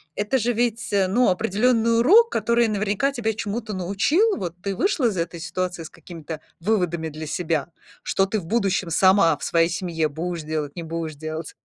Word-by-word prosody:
это 210 +6 0
же 240 +1 0
ведь, 235 0 -1
э, 195 -2 +2
ну, 240 +6 +3
определенный 225 +4 +2
урок, 435 - +6
который 235 - +2
наверняка 210 +5 0
тебя 225 -4 -1
чему-то 215 +1 -4
научил. 200 - +1
Вот 175 -2 -5
ты 200 -1 -3
вышла 290 - +1
из 210 - -1
этой 170 0 -3
ситуации 180 0 -3
с - - -9
какими-то 160 -2 -9 0.2
выводами 175 -4 0
для 155 +1 -7
себя, 160 -1 -2 0.3
что 195 - +1
ты 205 +2 -2
в 170 - -10
будущем 195 -3 0
сама 185 -3 +4
в - - -11
своей 165 0 +2
семье 165 -3 -1
будешь 165 +2 -4
делать, 150 -2 -4
не 170 - -5
будешь 160 -1 -5
делать. 155 +1 -6
190 Hz, 185 wpm, -23 LUFS, 165-225 Hz, 0.3 s, урок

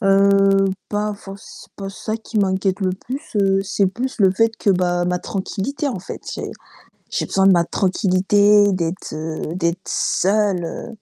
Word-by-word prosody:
Heu, 195 -1 +4 0.2
pas 210 0 -1
forc 195 0 -10
c'est 210 -1 -14
pas 195 -1 -6
ça 215 +2 -4
qui 220 -1 -4
m'inquiète 190 0 +1
le 185 -1 +1
plus, 250 +9 -5
heu, 195 -1 +2
c'est 200 0 +1
plus 255 +7 -4
le 190 -1 +6
fait 225 +3 +1
que 200 - +1
bah, 175 -1 +1
ma 180 0 0
tranquillité, 230 +11 -3
en 230 - -3
fait. 180 - -8
J'ai - - -5 0.6
j'ai - - -1
besoin 195 0 +2
de 195 - +7
ma 170 -1 +4
tranquillité, 200 +2 +3
d'être 175 0 -3
heu, 155 +1 -4
d'être 170 0 -1
seule, 195 -2 +1
heu, 165 - -6
195 Hz, 175 wpm, -20 LUFS, 185-205 Hz, 0.6 s, de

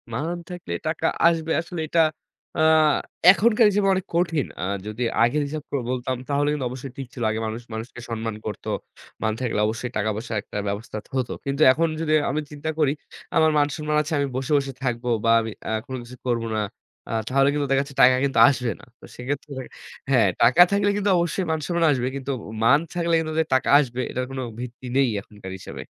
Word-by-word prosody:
মান 160 +9 -2
থাকলে 175 - -6
টাকা - - -2 0.2
আসবে। 165 -1 +1
আসলে 170 0 -6
এটা 165 +2 +3 0.6
আ - - +2 0.7
এখনকার 220 +3 +4
হিসেবে 200 0 +1
অনেক 190 0 -1
কঠিন। 165 -5 +1 0.2
আর 100 +2 -1
যদি 105 +3 -6 0.2
আগের 120 +6 +2
হিসাব 150 0 -5
করে 140 - -1
বলতাম 130 0 -1
তাহলে 145 0 +1
কিন্তু 145 -4 -2
অবশ্যই 130 +1 -7
ঠিক 135 -2 -5
ছিল। 120 - -5
আগে 110 +1 -1
মানুষ 110 +2 -5
মানুষকে 115 +2 -7
সম্মান 115 -1 -3
করত। 105 -3 -6 0.6
মান 110 -1 +1
থাকলে 120 -4 -1
অবশ্যই 115 +2 -3
টাকা-পয়সার 110 +2 -2
একটা 105 - -8
ব্যবস্থা 105 +2 -4 0.2
হত। 130 -2 0 0.2
কিন্তু 140 +2 -2
এখন 165 +6 +2
যদি 155 -1 +1 0.2
আমি 150 +3 -1
চিন্তা 150 +1 -5
করি, 145 -3 +3 0.4
আমার 160 0 +5
মান-সম্মান 150 +1 0
আছে, 155 +2 -4
আমি 140 - +1
বসে, 130 +2 -3
বসে 135 -1 -2
থাকব 120 -2 -1 0.2
বা - - +3
আমি 110 0 -4 0.2
আ - - -2
কোন 130 - -6
কিছু 120 +1 -11
করব 120 -2 0
না, - - 0 0.5
আ - - -4 0.2
তাহলে 135 +2 +3
কিন্তু 145 -1 -1
দেখাচ্ছে 140 +1 +1
টাকা 130 0 +7
কিন্তু 135 - +1
আসবে 125 -4 +1
না। - - -15
তো - - -13
সেক্ষেত্রে 140 +4 -5 0.6
হ্যা, 130 -2 +4 0.2
টাকা 130 +9 +6
থাকলে 200 0 +2
কিন্তু 205 0 0
অবশ্যই 175 +2 0
মান-সম্মান 165 +2 -1
আসবে। 125 -3 0
কিন্তু 140 0 -4 0.3
মান 135 +6 +6
থাকলে 170 -1 0
কিন্তু 155 -1 -3
যে - - +4
টাকা 130 - +2
আসবে 130 -4 -2
এটার 125 0 -2
কোনো 130 -1 -4 0.2
ভিত্তি 125 +1 -8
নেই 135 -1 +4
এখনকার 105 -2 -11
হিসাবে। - - -8
135 Hz, 195 wpm, -24 LUFS, 120-155 Hz, 0.7 s, টাকা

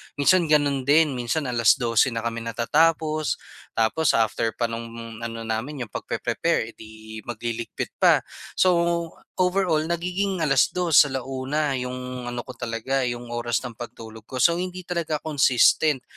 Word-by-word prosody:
minsan 165 +4 +3
ganun 145 -3 +2
din. 145 -3 +4
Minsan 125 +3 -1
alas-dose 115 +1 +3
na 115 - -2
kami 115 0 -2
natatapos 155 +7 +1 0.4
tapos 115 +7 +2
after 115 0 +1
pa 120 - +2
no'ng 115 0 -7
ano 115 -1 -5
namin, 125 +6 -3
yung - - -40
pagpe-prepare, - - -1
eh,'di 110 0 -11
magliligpit 115 0 -4
pa. - - +5 0.3
So, 185 - +3 0.7
overall, 180 -4 +2
nagiging 180 +1 -1
alas-dos, 150 +3 +4
ala-una 135 +2 -2
yung 125 0 -5
ano 120 0 -4
ko - - -9
talaga, 120 +2 -2
yung 120 0 -5
oras 120 +1 -1
ng 125 - -5
pagtulog 115 -2 -9
ko. 130 -1 -1
So, 170 0 +4
hindi 185 0 -5
talaga 170 -4 -3
consistent. 140 -1 +3
130 Hz, 135 wpm, -24 LUFS, 115-155 Hz, 0.7 s, pa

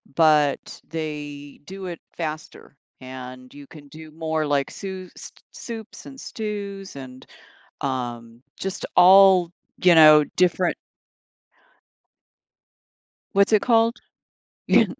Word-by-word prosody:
but 150 -3 +2
they 145 -3 -7
do 190 +2 -9
it 175 -2 -7 0.2
faster, 155 -3 -7 0.3
and 130 0 -10
you 145 -1 -13
can 145 -1 -14
do 155 +2 -12
more 160 0 -2
like 140 -1 0
sous 190 -2 -8
s - - -11 0.2
soups 225 -2 -9
and 270 -1 -12
stews 200 -4 -6
and, 130 -2 -11 0.6
um, 120 -3 -5 0.2
just 195 0 -5
all, 185 -1 +7 0.3
you 180 -2 +6
know, 155 -1 +8
different 180 0 +1 2.6
What's 200 +2 +3
it 210 - +4
called? 230 0 +3 0.7
Y - - +5
160 Hz, 110 wpm, -23 LUFS, 145-195 Hz, 2.6 s, know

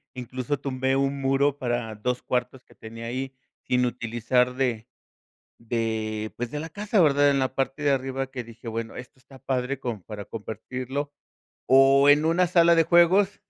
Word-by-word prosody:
incluso 130 +2 -4
tumbé 130 -1 -1
1 135 0 0
muro 135 +1 +2
para 120 -4 -3
2 125 +4 -2
cuartos 125 +1 -3
que - - -22
tenía 115 +1 -9
ahí 130 +3 -4 0.3
sin 125 0 +2
utilizar 125 +1 0
de 120 -4 -1 0.7
de, 110 -2 -3
pues, 120 0 -4
de 150 - -4
la 160 +2 -5
casa, 205 +3 0
¿verdad?, 145 -2 +4
en 140 - +1
la 130 0 -1
parte 135 +2 -2
de 145 - +3
arriba 135 0 -2
que 130 -1 -6
dije: 115 +1 -14
"Bueno, 115 0 -5
esto 130 +1 -11
está 135 +1 -16
padre 130 0 -2
como 120 -7 -5
para 105 0 -8
compartirlo, 130 +6 -5 0.6
o 135 +1 +6
en 145 +2 +6
una 175 +3 +3
sala 170 -1 +4
de 165 - +4
juegos 185 +5 +4
130 Hz, 175 wpm, -25 LUFS, 120-140 Hz, 0.7 s, o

